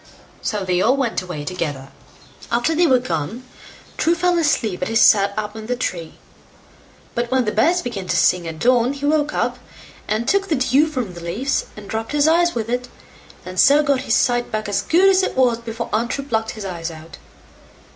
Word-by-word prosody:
So 205 -3 -2
they 180 -1 +1
all 255 +7 +3
went 250 -8 -1
away 180 -5 -6
together. 145 -6 -4 0.6
After 240 +7 +1
they 340 +2 +3
were 260 -3 +5
gone, 195 - -4 0.5
True 335 +2 +2
fell 355 0 +1
asleep 235 - 0
as 180 - -2
he 225 - -3
sat 200 -2 +5
up 210 0 -4
in 220 -1 -8
the 250 - -1
tree; 170 -9 -4 1.0
but 240 0 -2
when 260 -1 +1
the 210 - 0
birds 335 +13 +2
began 200 -7 -5
to - - 0
sing 180 -2 +2
at 160 -1 -6
dawn, 245 - +2
he 285 0 -5
woke 300 0 +1
up, - - -2 0.5
and 220 +3 -1
took 390 +5 +2
the 320 - +1
dew 270 +3 +3
from 255 - -4
the 175 - -10
leaves, 220 +12 -2
and 205 -1 -9
rubbed 225 +4 -3
his 295 0 +3
eyes 345 +2 +3
with 225 -2 -2
it, 250 +1 -2 0.6
and 185 0 -5
so 290 +2 +6
got 280 -3 +1
his 245 -3 +1
sight 245 -2 +1
back 215 0 -3
as 200 -1 0
good 360 +4 +3
as 385 -1 +5
it 375 - -2
was 245 -3 +3
before 230 0 -5
Untrue 235 +5 -1
plucked 225 -4 -2
his 210 - -6
eyes 170 -3 -4
out. 160 0 -12
235 Hz, 205 wpm, -20 LUFS, 195-280 Hz, 1.0 s, so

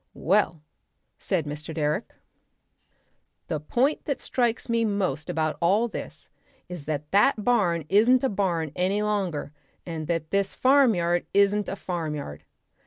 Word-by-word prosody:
"Well," 165 -4 +1 0.6
said 180 -6 -1
Mr. 150 +2 -6
Direck, 155 +6 -2 1.3
"the 155 -3 -1
point 245 - 0
that 280 - -2
strikes 240 -3 -1
me 230 -1 +1
most 190 -9 -1
about 155 -2 -1
all 200 +7 +3
this - - -8 0.4
is 175 -5 -8
that 150 -1 -4
that 210 +2 +3
barn 180 -10 +2
isn't 230 - +4
a 265 - +2
barn 175 -6 -1
any 190 +3 0
longer, 190 -9 -2 0.3
and 160 -3 -5
that 165 -2 -2
this 200 0 0
farmyard 220 -11 +3
isn't 200 +1 +3
a - - -3
farmyard. 155 - -5
185 Hz, 135 wpm, -26 LUFS, 155-210 Hz, 1.3 s, isn't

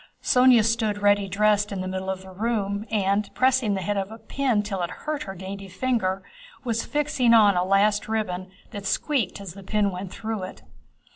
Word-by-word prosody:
Sónya 250 -3 +5
stood 220 -2 0
ready 205 -1 +4
dressed 210 +1 +2
in 195 -2 -3
the 185 - -4
middle 190 0 -4
of 190 0 -3
the 190 - -11
room 205 0 -2
and, 200 -1 +1
pressing 255 -5 +2
the 190 - -3
head 205 +1 -1
of 195 0 -2
a 225 - -8
pin 230 -1 0
till 195 -3 -3
it 175 - -1
hurt 300 +11 -4
her 195 - -7
dainty 195 +2 -7
finger, 195 -2 -1 0.4
was 230 -3 -1
fixing 285 -5 +2
on 205 -3 +6
a 180 - +2
last 200 +2 +2
ribbon 190 -4 -2 0.2
that 200 -1 -5
squeaked 245 -5 0
as 195 -4 -8
the 195 - -11
pin 205 +1 0
went 185 0 -6
through 220 -2 -4
it. 185 - -8
205 Hz, 200 wpm, -25 LUFS, 190-225 Hz, 0.4 s, on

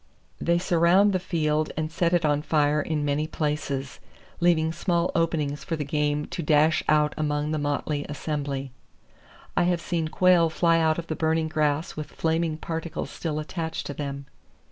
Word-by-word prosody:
They 170 0 +2
surround 175 +3 +4
the 185 - +1
field 155 -4 0
and 155 0 -2
set 170 +1 +1
it 175 -2 +2
on 145 -1 +2
fire 150 -1 +2
in 150 -1 -2
many 145 +2 0
places, 145 -3 -3 0.4
leaving 165 -2 +3
small 170 0 0
openings 150 -4 0
for 165 - -2
the 155 - -3
game 150 0 0
to - - -5
dash 155 +1 +3
out 150 -1 +3
among 150 0 -1
the 155 - -1
motley 145 0 -2
assembly. 145 -3 -3 0.8
I - - +3
have 175 -1 +1
seen 165 -1 -2
quail 175 0 +4
fly 165 +1 +3
out 160 -1 +2
of 170 - -4
the 160 - -3
burning 160 0 0
grass 150 0 0
with 155 -1 -5
flaming 160 -1 0
particles 165 0 -4
still 155 -3 -3
attached 160 +1 -4
to 145 - -4
them. 140 -1 -5
155 Hz, 170 wpm, -26 LUFS, 150-165 Hz, 0.8 s, surround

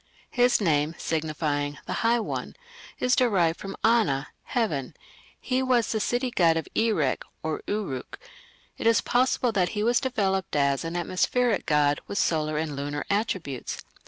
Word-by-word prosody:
His 245 0 +3
name, 155 -4 +1
signifying 150 -2 -2
"the - - -3
high 235 +1 +3
one", 225 - -4 0.4
is 250 +1 +2
derived 185 -10 +2
from 195 0 -6
"ana", 200 -12 +2 0.2
"heaven"; 155 - -1 0.4
he 255 0 0
was 250 -3 +2
the 220 - 0
city 245 +3 0
god 165 -6 +3
of 160 - -3
Erech 210 - +1 0.2
(Uruk). 160 -3 -3 0.6
It - - 0
is 230 -2 +5
possible 250 0 +2
that 185 -4 +1
he 210 - +1
was 235 +2 +3
developed 195 - -1
as 140 -1 +2
an 165 +1 -4
atmospheric 205 +7 +1
god 145 -1 +2
with 200 - -4
solar 155 -4 +1
and 155 -2 -2
lunar 145 +1 -3
attributes. 190 - -2
185 Hz, 150 wpm, -26 LUFS, 150-230 Hz, 0.6 s, is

